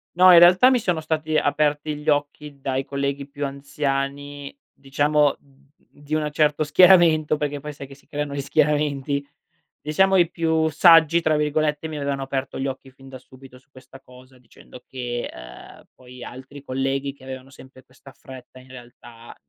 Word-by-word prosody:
No, 180 +1 +7
in 170 - +9
realtà 180 +8 +6
mi 255 - +2
sono 180 -7 -2
stati 155 0 -2
aperti 150 +1 0
gli 150 +1 -4
occhi 145 0 -2
dai 135 0 -3
colleghi 140 0 -4
più 145 0 -5
anziani, 140 0 -4 0.2
diciamo, 145 +1 0
d 140 0 -29 0.2
di 145 +1 -10
un 155 -1 -1
certo 150 0 +1
schieramento, 160 -2 +4
perché 145 -1 -4
poi 150 +1 -8
sai 140 -1 -10
che 135 - -14
si 135 - -25
creano 145 -1 -5
gli 140 - -3
schieramenti. 145 -1 -1 0.6
Diciamo 190 +6 +2
i 175 -2 +3
più 160 -2 0
"saggi”, 165 0 +5
tra 160 -2 +1
virgolette, 150 +1 -1
mi 155 -1 -7
avevano 140 -1 -3
aperto 135 0 -5
gli 135 - -2
occhi 135 0 -8
fin 135 +1 -17
da 130 - -10
subito 130 0 -17
su 130 - -26
questa 130 0 -16
cosa, 130 0 -18
dicendo 125 0 -17
che, 120 -2 -5
ehm, - - -13
poi 125 -1 -14
altri 130 +3 -11
colleghi 135 +1 -3
che 135 -1 -21
avevano 130 0 -9
sempre 130 -1 -16
questa 130 +2 -18
fretta, 130 -1 -14
in 130 0 -18
realtà, 120 -2 -14
140 Hz, 175 wpm, -22 LUFS, 135-150 Hz, 0.6 s, in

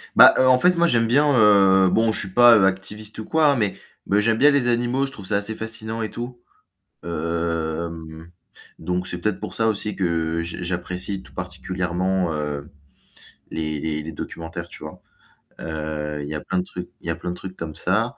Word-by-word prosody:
Bah - - +10
heu, 130 - +4
en 130 0 +6
fait, 180 +6 +4
moi 170 0 +4
j'aime 115 -6 +2
bien, 145 +5 +4
heu, 95 -3 +6
bon 115 +4 +2
je - - +3
suis 95 - -2
pas, 120 0 +8
heu, 95 - +4
activiste 105 +3 -3
ou 110 - -5
quoi, 160 -1 +3
hein, 140 - +4
mais 105 -6 0 0.3
mais 100 +1 +3
j'aime 110 +1 +2
bien 145 +5 +6
les 140 -4 +2
animaux, 120 +3 +1
je - - -5
trouve 100 -7 -10
ça 100 +2 0
assez 105 +2 -3
fascinant 110 0 -5
et 110 - -3
tout. 120 +1 -7 0.6
Hem, 85 0 -3 0.5
donc 90 +2 -2
c'est 90 - -4
peut-être 105 +1 -1
pour 105 - -6
ça 110 - +1
aussi 105 -1 -1
que 85 -3 -1
j 85 0 -6
j'apprécie 90 +2 -4
tout - - -18
particulièrement, 90 -1 -2
heu, 75 -1 -4 0.8
les 75 -2 -3
les 75 0 -2
les 80 +2 -7
documentaires, 85 +1 -7
tu - - -11
vois? 75 - -9 0.6
Heu, 75 -2 -4
il 70 - -6
y - - -4
a 75 - -4
plein 95 - -3
de - - -1
trucs 90 -1 -8
il - - -10
y - - -2
a - - 0
plein - - -6
de - - -5
trucs 95 +1 -9
comme 80 -4 -7
ça. 110 +7 0
95 Hz, 210 wpm, -23 LUFS, 85-110 Hz, 0.8 s, Bah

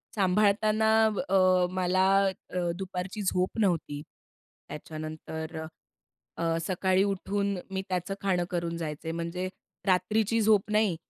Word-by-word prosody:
सांभाळताना 210 +2 +3 0.2
अब 215 -2 0 0.5
मला 185 +1 +2 0.4
अ, 180 - -2 0.2
दुपारची 190 +2 -5
झोप 185 +2 0
नव्हती. 165 -7 0 0.7
त्याच्यानंतर 155 +1 -6 0.8
अ, 165 0 0
सकाळी 185 +1 +2
उठून 200 0 -1
मी 190 - -1
त्याचं 185 +1 -2
खाणं 180 -3 +1
करून 170 -1 -2
जायचे. 160 0 -4
म्हणजे 170 +2 -3 0.4
रात्रीची 215 +4 +2
झोप 210 -1 +3
नाही. 210 -5 +3
185 Hz, 110 wpm, -28 LUFS, 170-200 Hz, 0.8 s, सांभाळताना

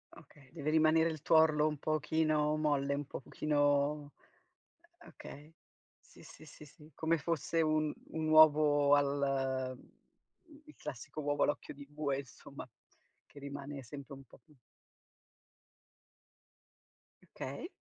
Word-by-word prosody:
Okay, 140 -3 -18
deve 155 -2 -4
rimanere 160 +1 +4
il 155 -2 -7
tuorlo 155 -1 +4
un 150 -2 -3
pochino 155 0 0
molle, 145 -2 0
un 145 +1 -3
po - - -6
pochino 145 +1 0 0.9
e 345 - -18
okay. 150 +3 -12 0.4
Sì, - - -19
sì, - - -14
sì, 150 0 -14
sì, 150 +1 -18
come 165 +1 +1
fosse 165 +1 -1
un 155 -1 +1 0.2
un 160 -1 -3
uovo 150 -2 +6
al 135 -2 0
mhmm - - -19
mhmm, - - -22 0.8
il 305 - -15
classico 130 +4 -7
uovo 145 0 +1
all'occhio 145 - -2
di 140 0 -12
bue, 145 -2 -2
insomma, 135 -4 -10 0.6
che - - -15
rimane 140 0 -7
sempre 140 +3 -9
un 135 0 -13
po' - - -19
più 155 - -24 2.8
Okay. - - -6
150 Hz, 130 wpm, -33 LUFS, 140-155 Hz, 2.8 s, uovo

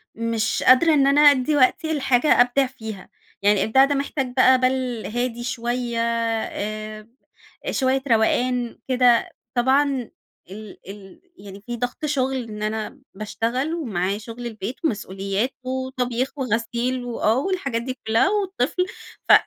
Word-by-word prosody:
مش 230 -1 -1
قادرة 310 +6 +6
إن 275 -2 +4
أنا 285 +2 +4
أدّي 290 0 +5
وقتي 290 +4 +2
لحاجة 265 -2 +3
أبدع 245 +3 +3
فيها، 220 -6 -9 0.3
يعني 205 -1 +3
إبداع 265 +5 +5
ده 285 - -1
محتاج 275 -2 -2
بقى 260 0 +5
بال 255 -2 -1
هادي 240 +1 -3
شوية 240 0 -2
آآ، 215 -2 -3 0.6
شوية 265 0 +1
روقان 245 +1 +1
كده. 250 -2 +3 0.3
طبعًا 265 0 +2 0.4
ال 210 +1 -10
ال 195 -2 -12 0.2
يعني 200 0 -12
في 240 0 -5
ضغط 245 +5 -3
شغل 265 -3 -1
إن 215 -2 -7
أنا 220 +5 -4
باشتغل 235 +8 -2
ومعايّا 200 - -2
شغل 230 +3 -9
البيت 220 +2 -6
ومسؤوليات 195 0 -2
وطبيخ 260 0 -3
وغسيل 245 0 -1
و 240 - -5
آه، 220 +2 +3
والحاجات 275 -7 -1
دي 255 +1 -6
كلها 225 - +3
والطفل. 380 -5 0 0.4
ف - - +9
245 Hz, 135 wpm, -22 LUFS, 220-265 Hz, 0.6 s, ف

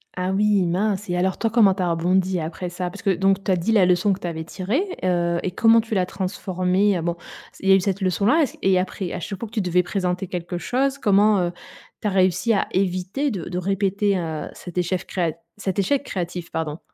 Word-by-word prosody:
Ah 185 +1 -1
oui, 205 0 +3
mince, 195 +3 -1
et 175 - 0
alors 190 +1 0
toi 225 - 0
comment 210 -4 +5
tu 190 - -2
as 175 - +1
rebondi 180 +2 +1
après 165 +3 -4
ça? 180 0 -4
Parce 200 - -10
que, 195 - +3
donc 195 +2 +1
tu 195 - 0
as 185 - +4
dit 180 +6 -1
la 205 -4 +5
leçon 180 +3 +3
que 190 - -6
tu - - -8
avais 160 -1 -4
tirée, 205 - -1 0.2
heu, 175 -2 +1
et 185 - -1
comment 225 +4 +5
tu 220 0 -7
l'as 185 -2 +2
transformée? 185 0 0
Heu, - - -3
bon, 170 0 -1 0.4
c - - -19
il - - +3
y - - +8
a - - +9
eu - - +4
cette 195 0 -1
leçon-là 200 - +2
et - - +4
ce - - -13
qu - - -17
et 190 -1 +4
après, 185 0 -3
à - - -3
chaque 190 +3 -5
fois 230 - -5
que - - -25
tu 220 - 0
devais 180 0 +2
présenter 180 0 -2
quelque 175 0 -4
chose, 265 +8 0
comment, 205 -3 +4
heu, 175 -1 0 0.5
tu 215 - -1
as 205 - 0
réussi 185 +3 +2
à 200 - +1
éviter 190 +9 0
de 185 -6 -5
de 180 - -4
répéter, 195 +1 0
heu, 160 -3 -4
cet 180 -1 -10
échef 180 +1 -1
créa 170 -4 -1 0.2
cet 195 -3 -3
échec 270 +8 +1
créatif? 175 -5 -5
Pardon. 160 -1 -3
185 Hz, 250 wpm, -23 LUFS, 180-200 Hz, 0.5 s, a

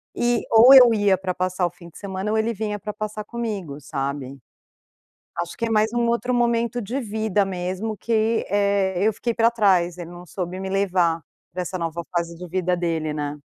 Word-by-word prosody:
e, 240 -1 +1
ou 230 +4 +8
eu 250 -3 +9
ia 205 -3 +3
para 185 0 -3
passar 185 0 0
o - - 0
fim 170 -1 -14
de - - -15
semana, 195 +1 -4
ou 220 - +1
ele 225 +1 0
vinha 210 -1 -3
pra 210 +1 -6
passar 215 0 -5
comigo, 210 -11 -5
sabe? 140 -1 -4 1.0
Acho 170 - -4
que 230 - -2
é - - -3
mais 215 0 +2
um 240 -1 +1
outro 235 +2 0
momento 235 0 +1
de 230 +6 -3
vida 215 -3 0
mesmo, 190 +3 -3
que, 225 +1 0
eh, 200 -1 +1
eu 220 - +3
fiquei 235 +3 -2
pra 230 0 +4
trás. 185 -6 +2
Ele 170 -1 -7
não 175 0 -11
soube 180 +2 -5
me 190 - -4
levar 180 -4 +1 0.3
pra 180 +1 -3
essa 185 +1 -4
nova 170 0 -3
fase 170 -1 -2
de 180 +1 -9
vida 180 +1 0
dele, 165 -3 -1
né? 145 0 -4
195 Hz, 205 wpm, -23 LUFS, 175-220 Hz, 1.0 s, eu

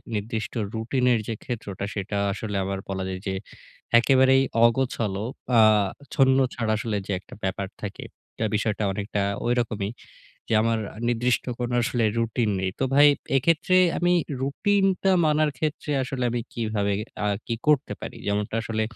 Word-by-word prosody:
নির্দিষ্ট 110 +2 -3 0.2
রুটিনের 120 +1 +1
যে 115 - -2
ক্ষেত্রটা, 100 -5 -5
সেটা 100 0 -3 0.2
আসলে 105 0 -5
আবার 95 0 -3
বলা 95 -1 -2
যায় 95 0 -4
যে 95 - -1 0.7
একেবারেই 130 +1 +5 0.2
অগোছালো, 115 -5 0 0.3
আ - - +7 0.5
ছন্ন-ছাড়া 130 -4 +2
আসলে 110 -1 -2
যে - - -4
একটা - - -16
ব্যাপার 95 0 -2
থাকে। 100 - -6 0.3
তা 110 - +1
বিষয়টা 105 0 -1
অনেকটা 100 +1 -2 0.2
ঐরকমই, 115 -4 0 0.6
যে - - -2
আমার 115 0 +1 0.3
নির্দিষ্ট 120 +1 +1 0.2
কোনো 120 0 -1
আসলে 120 0 0
রুটিন 115 -1 0
নেই। 95 0 0
তো - - +1
ভাই, 145 +1 +8 0.3
এক্ষেত্রে 165 +6 +2 0.2
আমি 175 0 +2 0.3
রুটিনটা 195 +7 +1
মানার 155 0 +3
ক্ষেত্রে 155 0 -2
আসলে 130 -1 -3
আমি 120 0 -1
কিভাবে 110 -3 -1 0.3
আ - - +1 0.2
কি 115 - -1
করতে 150 -3 +3
পারি? - - -7
যেমনটা 105 +1 -1
আসলে, 110 0 -2
115 Hz, 145 wpm, -25 LUFS, 105-130 Hz, 0.7 s, ভাই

